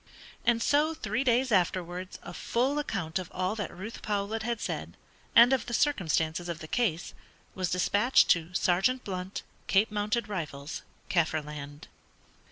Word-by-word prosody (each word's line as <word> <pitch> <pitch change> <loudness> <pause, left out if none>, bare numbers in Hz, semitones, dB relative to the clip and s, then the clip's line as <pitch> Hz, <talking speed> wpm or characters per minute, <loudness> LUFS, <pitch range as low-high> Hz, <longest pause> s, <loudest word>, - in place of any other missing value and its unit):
And 230 -1 +3
so 305 +3 +3
three 270 -4 -1
days 250 0 +2
afterwards 180 -1 0
a 175 - -8
full 260 +10 0
account 190 - -2
of 180 - -6
all 185 +3 -1
that 205 - -3
Ruth 205 +6 -8
Powlett 210 +1 -1
had 235 0 -2
said, - - -4 0.4
and 235 +3 +8
of 260 - 0
the 240 - -1
circumstances 175 - +1
of 170 - -3
the 155 - -9
case, 180 -5 0 0.4
was 185 -2 -2
despatched 205 +7 +3
to 170 -1 +3
"Sergeant 195 +9 +2
Blunt, 185 0 -5 0.2
Cape 205 +2 +3
Mounted 210 +3 -1
Rifles, 155 -7 -5 0.3
Kaffirland." 150 -3 -2
195 Hz, 150 wpm, -29 LUFS, 170-235 Hz, 0.4 s, and